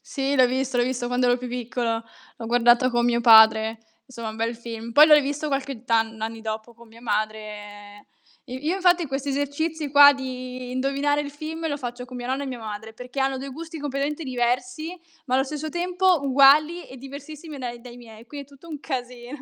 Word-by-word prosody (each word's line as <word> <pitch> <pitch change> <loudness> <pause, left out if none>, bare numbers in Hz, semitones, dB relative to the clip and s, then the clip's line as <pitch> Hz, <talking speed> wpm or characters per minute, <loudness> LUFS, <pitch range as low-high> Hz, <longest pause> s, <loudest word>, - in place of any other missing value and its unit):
Sì 275 +1 -2
l'ho 255 -2 +5
visto, 260 +1 -2
l'ho 245 - +3
visto 245 -1 -2
quando 250 +1 0
ero 245 0 +3
più 250 0 -7
piccolo. 240 -1 -2 0.3
L'ho 230 - -7
guardato 240 +2 +4
con 240 -1 +1
mio 240 0 +2
padre, 220 -1 +6 0.3
insomma 235 -4 -7
un 220 - -10
bel 230 +1 -2
film. 230 0 -8
Poi 300 +4 +8
l'ho 305 - +8
rivisto 290 +1 0
qualche 275 -4 -3
tan 225 -2 +1
n 220 - -14
anni 225 0 -4
dopo 220 +1 -6
con 235 0 -17
mia 225 +1 -16
madre. 210 -2 -5 0.4
Io 255 0 -6
io 305 +6 -1
infatti 360 -3 +3
questi 275 +1 -4
esercizi 285 +3 -2
qua 285 0 +9
di 255 -2 -6
indovinare 275 +3 0
il 285 - -5
film 315 +3 -5
lo 290 - -2
faccio 245 -2 -6
con 250 0 -10
mia 245 0 -6
nonna 265 +2 -2
e - - -4
mia 255 -2 -5
madre, 220 0 -7
perché 250 +3 -7
hanno 270 0 0
dei 275 +1 -7
gusti 320 +4 -8
completamente 290 +2 -3
diversi, 255 +6 -2 0.3
ma 255 - -1
allo 265 - +2
stesso 300 +2 -5
tempo 360 +2 +1
uguali 285 +5 +5
e 260 - -11
diversissimi 285 +3 -10
dai 240 -2 -6
dai 240 0 -12
miei. 230 -1 -14
Quindi 285 +3 -8
è - - -16
tutto 280 +4 -17
un 300 -3 -7
casi 245 -4 -5
255 Hz, 210 wpm, -24 LUFS, 235-285 Hz, 0.4 s, qua